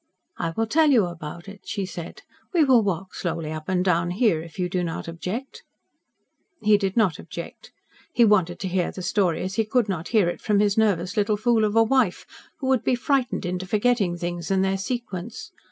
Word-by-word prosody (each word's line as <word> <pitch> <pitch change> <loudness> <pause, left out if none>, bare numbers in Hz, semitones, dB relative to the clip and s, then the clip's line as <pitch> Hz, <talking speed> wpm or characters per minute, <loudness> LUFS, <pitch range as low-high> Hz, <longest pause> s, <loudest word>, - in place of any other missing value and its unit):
"I 165 - -1
will 225 - +2
tell 305 +7 +3
you 235 -8 +5
about 170 +1 -8
it," 200 0 -11
she 205 -2 -2
said. 185 - -8 0.3
"We 330 - +6
will 260 -5 +5
walk 190 -2 -3
slowly 165 -3 -3
up 155 +1 -6
and 185 0 +1
down 175 -1 +2
here, 185 -3 +2
if 165 +2 -12
you 180 -1 0
do 180 0 -1
not 165 -1 -4
object." 220 - -5 1.0
He 215 0 +4
did 195 0 -1
not 190 -8 +2
object. - - -9 0.4
He 240 - +4
wanted 185 -5 +2
to 190 - -2
hear 180 -1 0
the 185 - -7
story 180 -3 +1
as 190 +2 -4
he 225 - +3
could 225 +1 +1
not 180 -4 -3
hear 215 -6 +3
it 175 - -3
from 210 -2 +2
his 205 -1 +2
nervous 200 -2 +1
little 210 0 +2
fool 230 0 +2
of 210 0 0
a 225 - +6
wife, 230 -5 +1 0.3
who 270 - -4
would 260 -3 +2
be 255 - +2
frightened 260 -3 0
into 180 +1 -3
forgetting 205 -4 +1
things 175 -1 -4
and 190 0 +2
their 190 0 +1
sequence. 240 - -5
195 Hz, 210 wpm, -24 LUFS, 175-225 Hz, 1.0 s, We